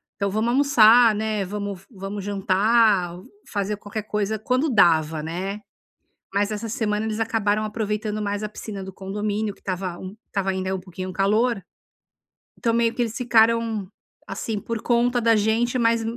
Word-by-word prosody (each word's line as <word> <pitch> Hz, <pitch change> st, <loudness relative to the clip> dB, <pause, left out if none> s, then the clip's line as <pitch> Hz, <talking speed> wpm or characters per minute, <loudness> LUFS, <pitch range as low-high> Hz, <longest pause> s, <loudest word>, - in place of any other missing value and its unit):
então 200 Hz, -1 st, -1 dB
vamos 220 Hz, +3 st, 0 dB
almoçar, 240 Hz, -4 st, +6 dB
né, 215 Hz, -1 st, -1 dB
vamos 200 Hz, -1 st, -5 dB
vamos 195 Hz, -1 st, -6 dB
jantar, 200 Hz, -1 st, +2 dB, 0.3 s
fazer 205 Hz, 0 st, -2 dB
qualquer 210 Hz, 0 st, -6 dB
coisa 210 Hz, 0 st, -2 dB
quando 255 Hz, +6 st, 0 dB
dava, 160 Hz, -6 st, +3 dB
né." 185 Hz, +6 st, -4 dB, 0.7 s
Mas 200 Hz, +1 st, +1 dB
essa 215 Hz, +2 st, -4 dB
semana 210 Hz, -1 st, -1 dB
eles 220 Hz, 0 st, -3 dB
acabaram 215 Hz, -2 st, +1 dB
aproveitando 215 Hz, 0 st, -2 dB
mais 205 Hz, 0 st, -2 dB
a 215 Hz, -, -3 dB
piscina 210 Hz, -2 st, -7 dB
do 190 Hz, -, -7 dB
condomínio 205 Hz, +2 st, -3 dB
que -, -, -24 dB
estava 185 Hz, -2 st, -4 dB, 0.3 s
estava 195 Hz, -1 st, -2 dB
ainda 190 Hz, 0 st, -1 dB
um -, -, -4 dB
pouquinho 185 Hz, 0 st, -7 dB
calor, 210 Hz, +4 st, +1 dB, 1.0 s
então 230 Hz, -, 0 dB
meio 230 Hz, 0 st, +2 dB
que -, -, -1 dB
eles 225 Hz, -1 st, -4 dB
ficaram, 230 Hz, -3 st, +2 dB, 0.4 s
assim, 210 Hz, +2 st, -4 dB
por 230 Hz, 0 st, -4 dB
conta 245 Hz, 0 st, +2 dB
da 230 Hz, -1 st, +4 dB
gente 225 Hz, +4 st, +1 dB
mas 230 Hz, -1 st, +2 dB
210 Hz, 155 wpm, -23 LUFS, 195-230 Hz, 1.0 s, almoçar